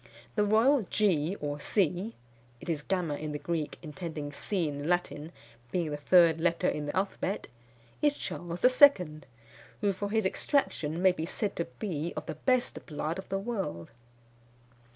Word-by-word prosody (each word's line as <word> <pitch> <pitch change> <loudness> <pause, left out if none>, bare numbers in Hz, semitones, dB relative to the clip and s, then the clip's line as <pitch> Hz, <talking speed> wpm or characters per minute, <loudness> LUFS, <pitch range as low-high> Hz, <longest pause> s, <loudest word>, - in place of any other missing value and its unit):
The 210 - +2
royal 230 +7 +4
G 185 -3 +2
or 145 0 -3
C 195 +5 0 0.4
[it - - -11
is 155 -3 0
gamma 175 -2 -1
in 150 0 -4
the - - -2
Greek, 160 -1 -3
intending 155 -2 -5
C 175 +3 -1
in 145 -1 -4
the 145 - -4
Latin, 170 -3 -1 0.4
being 170 -4 -1
the - - -1
third 165 +1 +5
letter 170 -1 +2
in 150 -1 -1
the - - -3
alphabet] 195 0 -1 0.6
is 295 -1 +3
Charles 175 +3 -3 0.2
II., 180 - +6 0.6
who 200 -2 +2
for 200 +2 -4
his 220 -1 +1
extraction 180 - 0
may 190 - +7
be 165 -2 -4
said 205 +2 -2
to 170 - 0
be 170 -5 -3
of - - -4
the - - -4
best 250 - 0
blood 155 +3 -3
of 190 - -9
the 195 - 0
world. 195 - -4
175 Hz, 170 wpm, -30 LUFS, 155-200 Hz, 0.6 s, may